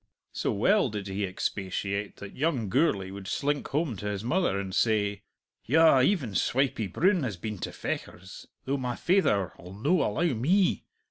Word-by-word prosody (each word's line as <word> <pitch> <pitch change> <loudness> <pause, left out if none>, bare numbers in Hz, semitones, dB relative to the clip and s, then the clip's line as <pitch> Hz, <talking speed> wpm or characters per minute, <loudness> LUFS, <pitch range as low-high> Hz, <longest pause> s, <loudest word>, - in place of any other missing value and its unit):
So - - -1
well 195 - +3
did 105 -2 -5
he 100 +1 -2
expatiate 100 +2 -3
that 100 - -10
young 135 - 0
Gourlay 105 - +1
would 100 -1 -8
slink 145 +6 -1
home 145 -3 -1
to 105 - -5
his 100 0 -3
mother 165 - +1
and 95 -1 -5
say, 105 -2 +1 0.4
"Yah, 155 0 +5
even 135 - +1
Swipey 120 +2 +1
Broon 180 - +2
has 110 -9 -3
been 105 +2 -5
to - - -4
Fechars, 95 +2 -6 0.2
though 140 +2 0
my 125 -2 -3
faither 135 - +2
'ull 90 +2 -11
no 150 - +2
allow 155 +9 +1
me!" 175 - +2
110 Hz, 165 wpm, -28 LUFS, 100-150 Hz, 0.4 s, Yah